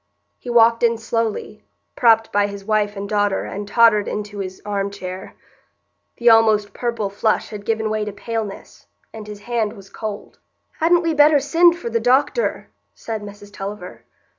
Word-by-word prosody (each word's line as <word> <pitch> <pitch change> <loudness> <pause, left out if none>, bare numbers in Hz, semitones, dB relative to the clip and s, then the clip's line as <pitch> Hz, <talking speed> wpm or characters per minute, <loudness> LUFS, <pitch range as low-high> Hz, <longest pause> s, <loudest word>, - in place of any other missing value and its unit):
He 245 - -9
walked 230 -1 +4
in 230 -1 +3
slowly, 230 -1 -3 0.3
propped 225 -3 +3
by 205 0 +2
his 200 -1 -9
wife 210 -1 0
and 200 +1 -4
daughter 205 -1 0
and 205 +1 -6
tottered 210 -1 +4
into 210 -1 -5
his 185 -1 -6
arm 200 -1 -2
chair. 185 -2 -8 0.8
The 240 - -2
almost 220 -2 +5
purple 235 -4 -2
flush 205 +2 -1
had 205 -1 -8
given 220 -1 0
way 215 0 -1
to 210 - -4
paleness, 215 0 -6 0.3
and 215 -1 -9
his 210 -1 -9
hand 225 -2 -2
was 195 -3 -14
cold. 215 -2 -7 0.4
"Hadn't 345 +2 +3
we 330 -1 0
better 295 0 +5
send 335 +5 +4
for 235 -9 -6
the 230 - +1
doctor?" 260 - +1 0.3
said 220 -2 -5
Mrs 205 0 -11
Tulliver. 195 -1 -7
215 Hz, 165 wpm, -20 LUFS, 205-230 Hz, 0.8 s, almost